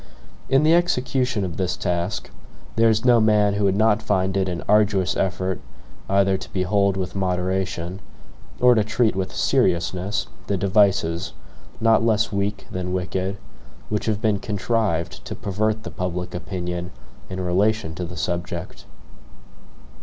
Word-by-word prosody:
In 135 +2 +4
the 155 +1 +5
execution 125 - +1
of 85 -3 -5
this 90 -3 -1
task, 85 +3 -2 0.4
there 115 0 +5
is 110 +2 +1
no 120 -2 +6
man 105 -2 +4
who 100 0 +1
would 95 -1 +2
not 110 0 +3
find 95 -1 0
it 95 -1 +1
an 85 -2 -4
arduous 100 -5 +3
effort 95 -1 -1 0.5
either 95 0 +3
to - - -9
behold 100 +1 +1
with 95 -1 -3
moderation, 90 -1 -2 0.6
or 125 0 +6
to 110 -3 +3
treat 115 0 +1
with 95 -1 -2
seriousness, 95 +3 +1 0.2
the 100 - 0
devices, 95 -3 +2 0.5
not 115 0 +4
less 110 -2 +2
weak 100 0 -2
than 90 0 -3
wicked, 95 +2 -2 0.5
which 105 +1 -2
have 110 0 -1
been 105 -2 +2
contrived 100 -7 -1
to - - -5
pervert 110 +2 -1
the - - -6
public 90 0 -4
opinion 90 0 -4 0.4
in 95 - -5
relation 95 0 +1
to 90 - -5
the 90 0 -7
subject. 85 +1 -4
95 Hz, 145 wpm, -23 LUFS, 90-105 Hz, 0.6 s, no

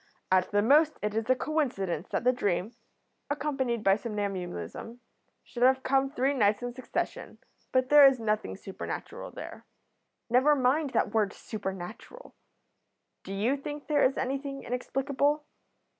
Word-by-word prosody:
At 185 -1 +3
the 205 0 +2
most 300 +6 +4
it 210 0 -1
is 225 +2 -2
a 255 - +5
coincidence 240 - -1
that - - -1
the 250 - +5
dream, 205 -3 -1 0.6
accompanied 270 -6 -1
by 195 +1 +4
somnambulism, 200 - -5 0.4
should 240 - -9
have 260 +1 +4
come 270 0 +2
three 275 0 0
nights 210 -3 +2
in 245 0 -4
succession, 255 +1 -4 0.3
but 255 0 +2
there 295 -1 +9
is 265 -2 +2
nothing 215 -1 -1
supernatural 195 -1 -7
there." - - -9 0.6
"Never 260 +5 +4
mind 275 +3 +2
that - - +1
word 210 -3 +1
supernatural. 205 - -7 0.9
Do - - -8
you 215 +7 +1
think 290 +1 -7
there 295 -2 +2
is 265 - +2
anything 275 +1 -3
inexplicable? 280 +4 -1
250 Hz, 145 wpm, -29 LUFS, 210-275 Hz, 0.9 s, there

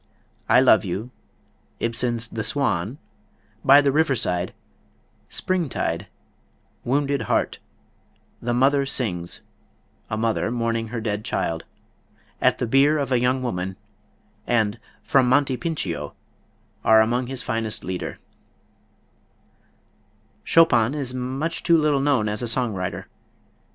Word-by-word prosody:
"I 125 +3 +6
Love 125 -5 +5
You," 100 +6 -4 0.7
Ibsen's 115 0 -1
"The 110 -1 -4
Swan," 130 - -1 0.7
"By 140 +2 +7
the 140 -1 +2
Riverside," 120 - +1 0.8
"Springtide," 135 - -2 0.8
"Wounded 140 +2 0
Heart," - - 0 0.8
"The 120 - -2
Mother 135 +3 +3
Sings" 90 -11 -2 0.7
(a 110 - -2
mother 110 0 0
mourning 115 -1 -1
her 115 +1 -5
dead 105 -1 -2
child), 80 -7 -2 0.8
"At - - +3
the - - -1
Bier 140 +6 +4
of 140 -3 -2
a 125 - +3
Young 130 +1 +1
Woman," 95 -5 -3 0.7
and 110 -2 +1 0.2
"From 130 -2 +3
Monte 135 0 +3
Pincio," 90 - -3 0.7
are 110 0 +6
among 120 +3 0
his 130 -1 -4
finest 115 -3 -2
Lieder. 90 -1 -4 2.3
Chopin 135 -6 +4
is 135 -4 -3
much 130 +6 -3
too 170 -1 +4
little 150 -3 +2
known 135 -6 +2
as 105 +2 -3
a 120 - -2
song 115 -1 0
writer. 95 0 -4
120 Hz, 120 wpm, -23 LUFS, 110-135 Hz, 2.3 s, By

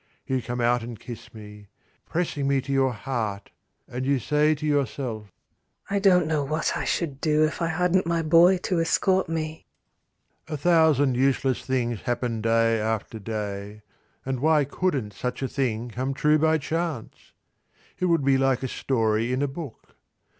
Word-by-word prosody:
You 130 -1 -1
come 120 +2 -5
out 120 0 +2
and 115 -1 -8
kiss 120 -2 -10
me, 105 -1 -12 0.4
pressing 160 -5 -1
me 140 -1 +2
to 135 +1 -6
your 135 -1 +3
heart, 110 -4 -4 0.4
and 125 +1 -5
you 140 +1 +2
say 150 +5 +2
to 155 +1 -6
yourself, 130 -7 -2 0.6
"I 200 - +2
don't 180 -3 +4
know 155 -2 0
what 155 +4 -1
I - - -2
should 140 -6 -2
do 155 -1 +3
if 155 - -4
I 170 - +1
hadn't 180 +2 +1
my 170 -1 0
boy 170 +4 +6
to 180 -3 +1
escort 185 +2 +2
me." 160 -1 -4 0.8
A 155 - -4
thousand 155 -4 +4
useless 130 0 +1
things 120 -4 -1
happen 120 -2 -2
day 115 0 +2
after 110 +1 -2
day, 105 -1 -5 0.4
and 130 -1 -2
why 150 +1 +3
couldn't 140 - -2
such 125 +7 -4
a - - 0
thing 120 -3 -2
come 130 +4 -3
true 150 +2 +3
by 160 +1 +3
chance? 160 -3 -4 0.7
It 185 - +1
would 165 -5 +2
be 135 -1 +4
like 135 -1 +1
a - - 0
story 115 -3 0
in 130 +2 0
a - - +1
book. 140 -2 -9
135 Hz, 170 wpm, -25 LUFS, 115-155 Hz, 0.8 s, boy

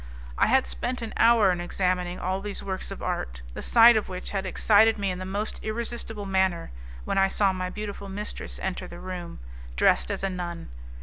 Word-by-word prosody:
I - - +3
had 260 +3 +4
spent 250 0 -2
an 225 - -5
hour 225 -4 +5
in 175 -1 -2
examining 180 0 -1
all 190 +1 -2
these 205 0 -5
works 190 -1 -4
of - - -7
art, 60 0 -3
the - - -6
sight 235 0 +7
of 215 - 0
which 185 0 -5
had 195 -1 -2
excited 220 +4 +4
me 200 -2 -1
in 180 - -5
the 185 - -5
most 205 +3 -3
irresistible 225 -1 -3
manner, 190 - 0 0.3
when - - 0
I 195 - +5
saw 195 0 +2
my 185 0 -3
beautiful 205 0 -6
mistress 205 +2 -5
enter 185 -1 -3
the 175 - -10
room, 180 -2 -6 0.4
dressed - - +3
as - - -3
a 195 - +1
nun. 175 -2 -5
195 Hz, 200 wpm, -26 LUFS, 180-215 Hz, 0.4 s, sight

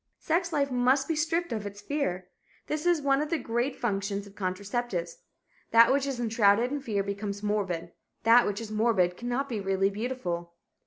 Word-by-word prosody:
Sex 340 +2 0
life 280 -3 0
must 255 +2 +2
be 325 - 0
stripped 330 +3 0
of 210 -2 -3
its 205 0 -9
fear. 185 -10 -2 0.4
This 305 +3 -2
is 340 -4 +3
one 275 0 +3
of 300 - -2
the 335 - +1
great 240 +1 -1
functions 200 -2 -2
of 200 - -14
contraceptives. 190 -1 -3 0.5
That 230 +2 +6
which 280 0 +1
is 265 -3 -3
enshrouded 225 0 +3
in 290 0 -2
fear 210 -6 -1
becomes 200 0 -4
morbid. 190 -5 -1 0.3
That 230 +2 +6
which 205 0 -2
is 225 -2 -7
morbid 215 -5 +2
cannot 245 +6 -2
be 230 -5 -3
really 195 0 +1
beautiful. 190 -7 -4
225 Hz, 180 wpm, -28 LUFS, 200-270 Hz, 0.5 s, That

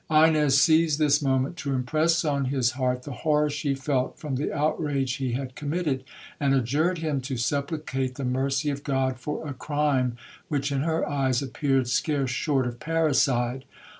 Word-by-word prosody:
Ines 155 -3 +5
seized 160 0 +4
this 150 -1 +3
moment 135 +3 0
to 140 -5 -2
impress 155 +7 +1
on 140 -2 0
his 130 -2 +1
heart 125 -1 -1
the 145 - -7
horror 150 -1 +2
she 145 -1 -1
felt 135 -1 -1
from 150 -4 -4
the 140 +4 -2
outrage 145 -3 0
he 130 -3 -2
had 130 0 -4
committed, 145 -2 -2 0.4
and 140 -1 +2
adjured 145 +8 +1
him 155 -4 -1
to 130 0 -4
supplicate 135 0 -2
the 140 - -4
mercy 135 +3 0
of 140 0 -5
God 130 -3 0
for 150 +4 -4
a 145 - -4
crime, 135 -3 0 0.3
which, 145 -4 -1
in 135 -1 0
her 160 +2 0
eyes, 135 -2 0
appeared 135 -1 0
scarce 135 +1 0
short 135 +1 0
of 120 -1 -5
parricide. 135 -6 +1
140 Hz, 170 wpm, -26 LUFS, 130-150 Hz, 0.4 s, Ines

